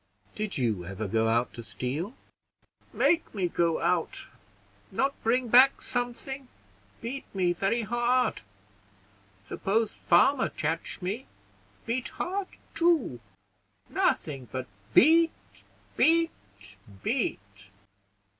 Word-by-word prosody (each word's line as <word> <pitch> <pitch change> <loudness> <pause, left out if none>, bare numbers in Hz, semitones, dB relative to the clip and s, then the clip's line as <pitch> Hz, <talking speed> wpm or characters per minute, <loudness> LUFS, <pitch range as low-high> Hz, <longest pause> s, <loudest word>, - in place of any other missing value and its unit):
"Did 215 -2 -3
you 110 -8 0
ever 100 +4 -5
go 110 +3 +1
out 120 +2 +1
to 120 - -7
steal?" 150 - -4 0.8
"Make 340 -8 +1
me 190 -3 +1
go 170 -1 +1
out. - - 0 0.6
Not 275 +1 +1
bring 245 +2 +2
back 255 +4 +7
something, 255 +2 -4 0.5
beat 260 +4 -5
me 180 -2 +2
very 195 +7 0
hard; 240 +3 +1 1.1
suppose 215 +2 0
farmer 255 +10 +3
catch 160 +4 -3
me, 210 +8 -3 0.6
beat 240 +2 -2
hard 380 +2 -2 0.3
too; 330 - +2 0.7
nothing 135 -4 0
but 130 -1 -3 0.3
beat, 325 +4 +6 0.6
beat, 330 +1 +4 0.7
beat." 100 - -3
225 Hz, 100 wpm, -28 LUFS, -, 1.1 s, back